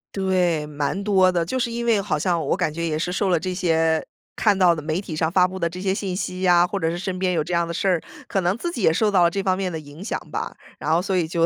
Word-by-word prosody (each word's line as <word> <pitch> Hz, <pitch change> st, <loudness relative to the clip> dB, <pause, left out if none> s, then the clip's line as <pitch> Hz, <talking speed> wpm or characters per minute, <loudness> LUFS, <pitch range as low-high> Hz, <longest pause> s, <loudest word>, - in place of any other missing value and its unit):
对， 180 Hz, -5 st, +1 dB
蛮 150 Hz, +5 st, -2 dB
多 190 Hz, -3 st, +4 dB
的。 170 Hz, -2 st, 0 dB
就 260 Hz, -, -2 dB
是 240 Hz, -2 st, -1 dB
因 235 Hz, 0 st, -3 dB
为 225 Hz, -4 st, +3 dB
好 175 Hz, -7 st, -1 dB
像 170 Hz, -1 st, 0 dB
我 -, -, +2 dB
感 180 Hz, -5 st, -1 dB
觉 170 Hz, +1 st, -3 dB
也 155 Hz, -2 st, -1 dB
是 175 Hz, -, -2 dB
受 195 Hz, +1 st, 0 dB
了 175 Hz, -2 st, +3 dB
这 185 Hz, +3 st, -3 dB
些 165 Hz, -3 st, +1 dB, 0.3 s
看 210 Hz, -3 st, +2 dB
到 180 Hz, -3 st, +5 dB
的 155 Hz, -, -5 dB
媒 155 Hz, +3 st, -2 dB
体 185 Hz, -5 st, -6 dB
上 160 Hz, +1 st, 0 dB
发 180 Hz, 0 st, +4 dB
布 185 Hz, +1 st, -7 dB
的 170 Hz, -2 st, 0 dB
这 180 Hz, +2 st, -8 dB
些 190 Hz, 0 st, +1 dB
信 195 Hz, -3 st, -3 dB
息 185 Hz, -1 st, -4 dB
呀， 175 Hz, -1 st, +5 dB
或 200 Hz, -, -3 dB
者 165 Hz, -2 st, 0 dB
是 170 Hz, -, -3 dB
身 185 Hz, +1 st, -3 dB
边 185 Hz, 0 st, 0 dB
有 170 Hz, -3 st, +1 dB
这 175 Hz, -, -5 dB
样 170 Hz, 0 st, +2 dB
的 170 Hz, -, -5 dB
事 195 Hz, -, -1 dB
儿， 180 Hz, -4 st, +2 dB, 0.3 s
可 195 Hz, -, 0 dB
能 180 Hz, +3 st, 0 dB
自 340 Hz, +8 st, -3 dB
己 245 Hz, -, -5 dB
也 175 Hz, -, +5 dB
受 210 Hz, +6 st, +2 dB
到 190 Hz, -3 st, +4 dB
了 170 Hz, -, +5 dB
这 195 Hz, +3 st, -2 dB
方 185 Hz, -1 st, +1 dB
面 190 Hz, -2 st, -2 dB
的 160 Hz, -, -4 dB
影 150 Hz, +3 st, -11 dB
响 215 Hz, -, -2 dB
吧。 -, -, -4 dB, 0.3 s
然 155 Hz, -, -2 dB
后 165 Hz, +2 st, +3 dB
所 190 Hz, +1 st, -1 dB
以 175 Hz, -3 st, +2 dB
就 165 Hz, 0 st, +1 dB
180 Hz, 335 characters per minute, -23 LUFS, 165-190 Hz, 0.3 s, 到